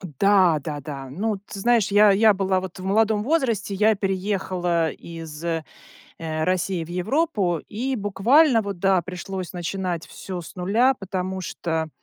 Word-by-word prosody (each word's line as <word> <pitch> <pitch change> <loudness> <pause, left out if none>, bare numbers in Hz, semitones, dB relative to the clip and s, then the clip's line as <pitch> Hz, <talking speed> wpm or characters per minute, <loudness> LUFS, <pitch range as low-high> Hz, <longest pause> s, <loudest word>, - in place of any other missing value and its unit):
Да, 185 0 +3
да-да, 145 -2 -6
ну 205 +9 -2
ты 200 - -8
знаешь 235 -1 +3
я 205 0 +7
я 210 +2 +5
была 190 -1 +1
вот 185 -1 -8
в - - -8
молодом 210 +2 +2
возрасте, 240 - 0
я 215 +3 +4
переехала 185 -4 -1
из, 165 -2 -9
э, 165 -2 -1 0.6
э, 155 -1 -3
России 185 -1 0
в - - -15
Европу, 195 - 0
и 255 +5 -2
буквально, 230 +6 +4
вот 200 -3 -5
да, 190 -1 +3
пришлось 185 +1 -6
начинать 180 -1 -3
всё 185 -2 -7
с 170 - -10
нуля, 215 +9 +3
потому 190 -3 -4
что, 160 -2 -3
190 Hz, 155 wpm, -23 LUFS, 175-210 Hz, 0.6 s, я